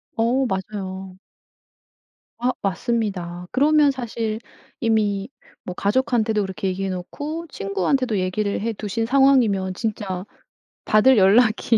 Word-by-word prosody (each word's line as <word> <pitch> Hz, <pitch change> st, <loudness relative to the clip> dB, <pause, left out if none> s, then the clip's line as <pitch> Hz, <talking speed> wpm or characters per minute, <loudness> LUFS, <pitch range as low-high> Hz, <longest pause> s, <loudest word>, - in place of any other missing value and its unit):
어 245 Hz, +3 st, +2 dB
맞아요. 190 Hz, -2 st, -5 dB, 1.2 s
아 245 Hz, +1 st, +1 dB
맞습니다. 190 Hz, -4 st, -2 dB
그러면 295 Hz, +2 st, +4 dB
사실 230 Hz, -4 st, -3 dB, 0.4 s
이미 210 Hz, -4 st, +1 dB, 0.4 s
뭐 180 Hz, -, -5 dB
가족한테도 220 Hz, +1 st, +1 dB
그렇게 190 Hz, 0 st, -4 dB
얘기해 190 Hz, +1 st, -2 dB
놓고 290 Hz, -, -5 dB
친구한테도 205 Hz, +3 st, -1 dB
얘기를 200 Hz, +3 st, -1 dB
해 230 Hz, 0 st, -1 dB
두신 215 Hz, +2 st, -3 dB
상황이면 240 Hz, -8 st, +3 dB
진짜' 195 Hz, -3 st, -3 dB, 0.6 s
받을 235 Hz, +4 st, +5 dB
연락이 220 Hz, +3 st, +4 dB
215 Hz, 265 characters per minute, -22 LUFS, 190-245 Hz, 1.2 s, 받을